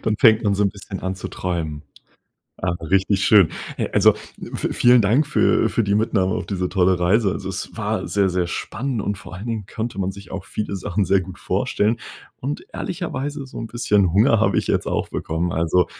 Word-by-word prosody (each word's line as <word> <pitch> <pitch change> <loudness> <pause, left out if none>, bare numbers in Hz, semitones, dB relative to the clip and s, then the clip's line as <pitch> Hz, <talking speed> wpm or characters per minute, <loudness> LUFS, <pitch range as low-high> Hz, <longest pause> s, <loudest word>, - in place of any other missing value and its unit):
Dann 110 -1 0
fängt 110 -1 +6
man 100 -2 +2
so 105 - +1
'n 100 - +2
bisschen 100 0 -8
an 95 0 -2
zu 95 - -6
träumen. 80 -5 -3 0.8
Ah, 90 -1 0
richtig 95 +3 +2
schön. 100 -7 +6 0.3
Äh, - - -1
also, - - +5 0.3
v - - -3
vielen 120 0 +5
Dank 115 +9 +3
für - - +3
für 115 - 0
die 100 0 +1
Mitnahme 105 -4 +1
auf - - -3
diese 90 -2 -2
tolle 95 -1 +2
Reise. 95 +4 +3
Also, - - -5
es - - -5
war - - -2
sehr, 100 -1 +2
sehr 90 -1 0
spannend 125 +7 -3
und 100 +1 -2
vor 95 - -11
allen 95 +5 -7
Dingen 110 -4 -3
könnte 110 0 -5
man 95 0 0
sich 100 -1 -11
auch 95 0 -5
viele 105 0 -4
Sachen 95 +1 -1
sehr 95 +1 +3
gut 90 0 -9
vorstellen. 110 +3 0 0.4
Und 140 +3 -5
ehrlicherweise 145 -5 -4
so 130 - -9
'n 115 - -5
bisschen 105 -7 +2
Hunger 110 +3 +4
habe 100 -4 +3
ich - - -1
jetzt - - 0
auch - - -1
bekommen. 85 +2 -2
Also, 85 +2 +2
100 Hz, 210 wpm, -22 LUFS, 90-110 Hz, 0.8 s, fängt